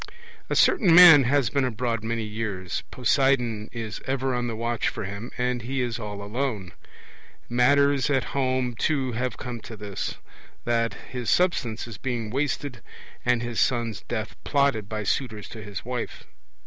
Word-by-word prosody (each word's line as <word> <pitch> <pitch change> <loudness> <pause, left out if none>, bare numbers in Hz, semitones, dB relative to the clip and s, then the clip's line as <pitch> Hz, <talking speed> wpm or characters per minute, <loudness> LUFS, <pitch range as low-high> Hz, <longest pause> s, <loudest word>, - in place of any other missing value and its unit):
A - - 0
certain 175 -6 +5
man 170 -6 +10
has 135 -2 +2
been 140 -2 +1
abroad 115 -2 -1
many 115 0 -2
years; 105 -4 -4
Poseidon 125 -3 +1
is 110 -3 -6
ever 135 0 0
on 120 0 -1
the 115 - -3
watch 115 +1 -1
for - - -5
him, 100 +4 -6
and 125 0 0
he 130 +4 -3
is 120 -2 -1
all 105 -2 -6
alone. 105 -4 -3 0.8
Matters 140 +3 +3
at 135 -3 +2
home 130 -2 0
too 135 +1 0
have 125 0 -2
come 125 -2 -6
to 110 0 -10
this, 100 -2 -5 0.5
that 115 -1 +1 0.2
his 125 -3 -3
substance 125 -11 +1
is 115 - -9
being 120 -5 -3
wasted 140 -1 -2 0.4
and 125 -1 +2
his 120 -1 -3
son's 115 -5 0
death 110 -2 -4
plotted 140 -8 +1
by 110 -1 -3
suitors 110 -1 -2
to 110 - -8
his 105 -1 -7
wife. 125 -1 -4
120 Hz, 160 wpm, -25 LUFS, 110-130 Hz, 0.8 s, man